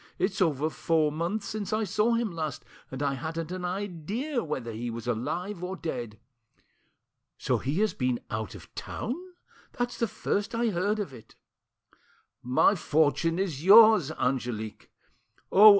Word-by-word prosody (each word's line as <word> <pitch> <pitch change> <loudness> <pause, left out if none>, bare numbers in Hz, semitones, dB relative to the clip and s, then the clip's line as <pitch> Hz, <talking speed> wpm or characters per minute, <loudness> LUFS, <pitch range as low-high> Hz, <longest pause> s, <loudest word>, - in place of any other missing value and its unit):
It's 195 +1 0
over 155 -3 +2
four 155 -2 +1
months 175 +7 -2
since 215 -2 -4
I 215 +1 +1
saw 220 +3 +2
him 230 -3 0
last, 160 -3 -4 0.2
and 135 +2 -4
I 140 -1 +1
hadn't 165 +3 -4
an 185 0 -4
idea 205 - -2
whether 130 -7 -4
he 115 +2 -4
was 115 0 -6
alive 170 - -2
or 185 +1 -3
dead. 120 - -5 1.2
So - - 0
he 145 +9 -1
has 215 - +2
been 125 -2 0
out 110 -4 -3
of - - -13
town? 235 - -4 0.6
That's 245 -1 -3
the 230 - +2
first 205 +2 -2
I 235 0 +2
heard 205 +3 0
of 200 -10 -4
it." 115 -3 -14 1.1
"My 125 +10 +4
fortune 160 -1 +2
is 170 -7 -2
yours, 215 -4 +8
Angelique! 120 -6 -2 0.6
Oh! 210 +3 +10
170 Hz, 150 wpm, -28 LUFS, 135-205 Hz, 1.2 s, Oh